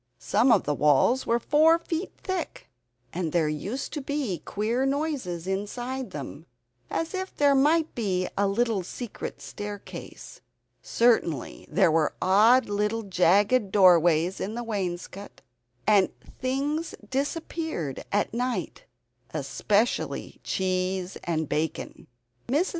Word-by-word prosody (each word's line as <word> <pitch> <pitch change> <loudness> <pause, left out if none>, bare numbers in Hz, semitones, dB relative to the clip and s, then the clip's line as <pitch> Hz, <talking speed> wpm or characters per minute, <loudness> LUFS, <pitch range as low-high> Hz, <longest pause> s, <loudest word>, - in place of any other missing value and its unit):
Some 230 +5 +2
of - - +5
the 150 - 0
walls 150 - +3
were 235 - +3
four 310 +6 +4
feet 335 +1 -4
thick, 370 - -4 0.4
and 170 -2 -2
there 165 -2 +2
used 190 - -4
to 295 - -3
be 265 - -2
queer 220 - -1
noises 270 - -2
inside 240 +7 -3
them, - - -8 0.4
as 330 +2 -2
if 375 0 -4
there 285 -1 +4
might 305 +4 +3
be 185 -6 -1
a 200 0 +2
little 220 0 +1
secret 220 +5 -7
staircase. 205 -1 -8 0.4
Certainly 220 - +1
there 185 -4 +3
were 155 -1 +1
odd 220 +7 +5
little 210 +2 -1
jagged 200 +4 +3
doorways 175 -2 +5
in 210 +4 -3
the 240 - -3
wainscot, 195 -2 -5 0.4
and 200 -3 +4 0.3
things 285 +5 -1
disappeared 285 - -3
at 205 +1 0
night 250 +1 -3 0.5
especially 215 +3 -1
cheese 185 0 -1
and 160 -2 -1
bacon. 155 +2 -3 0.4
Mrs. 300 +9 +1
210 Hz, 120 wpm, -26 LUFS, 185-265 Hz, 0.5 s, of